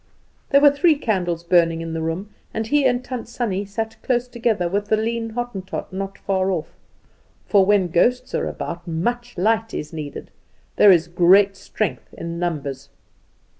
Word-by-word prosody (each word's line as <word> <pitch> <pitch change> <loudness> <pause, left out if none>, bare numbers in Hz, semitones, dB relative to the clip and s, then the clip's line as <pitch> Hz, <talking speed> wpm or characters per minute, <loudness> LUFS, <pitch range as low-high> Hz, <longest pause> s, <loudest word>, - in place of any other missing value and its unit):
There 280 0 +5
were 290 -1 +8
three 310 +3 +3
candles 180 - -1
burning 170 -2 +3
in 165 -1 -5
the 165 - -3
room, 165 +6 -3 0.2
and 220 0 -1
he 285 +4 +2
and 245 0 0
Tant 245 -3 -5
Sannie 210 -5 -2
sat 220 +2 -5
close 245 -1 0
together, 230 -7 0
with 200 +3 -1
the 215 - +2
lean 225 +1 -2
Hottentot 210 -7 -5
not 195 +1 -4
far 190 -1 0
off; 175 -5 -2 0.8
for 195 -2 +4
when 200 -3 +4
ghosts 245 +9 +1
are - - 0
about 170 +1 -6
much 240 +9 -2
light 225 +4 +1
is 150 +1 -5
needed, 150 -3 -7 0.5
there 205 - +8
is 170 -2 +4
great 185 +3 +5
strength 210 -2 -4
in 170 0 -5
numbers. 140 -5 -3
195 Hz, 170 wpm, -22 LUFS, 170-230 Hz, 0.8 s, were